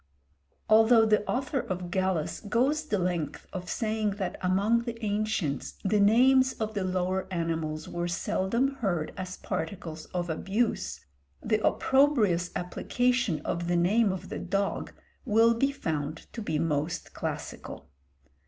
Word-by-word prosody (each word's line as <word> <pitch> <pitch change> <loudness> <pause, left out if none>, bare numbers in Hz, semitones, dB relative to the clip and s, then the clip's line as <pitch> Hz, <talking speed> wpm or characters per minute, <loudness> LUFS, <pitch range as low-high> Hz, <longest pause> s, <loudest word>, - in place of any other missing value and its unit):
Although 225 +1 +6
the 215 -1 +3
author 265 +2 0
of 180 -5 -4
Gallus 185 -4 0
goes 260 +8 +1
the 210 - +1
length 175 -5 -2
of 180 -2 -5
saying 215 -3 -1
that 190 -3 -3
among 200 +5 +2
the 235 -1 -5
ancients 205 -9 -1
the 205 +1 +2
names 260 +5 +5
of 220 -1 -3
the 200 -3 -1
lower 185 0 -1
animals 165 -3 -2
were 175 0 -3
seldom 230 +10 0
heard 175 -10 -1
as 185 0 -6
particles 160 -1 -5
of 175 -1 -3
abuse, 195 +8 -1 0.4
the 215 -1 +1
opprobrious 225 - +3
application 235 -1 0
of 170 +2 -3
the 175 - +1
name 200 +5 +3
of 185 - -6
the - - -4
dog 195 +2 -2 0.3
will 225 +2 +4
be 275 +4 +1
found 155 - -3
to 230 - -5
be 160 -7 -1
most 155 0 -2
classical. - - -6
195 Hz, 140 wpm, -28 LUFS, 175-230 Hz, 0.4 s, Although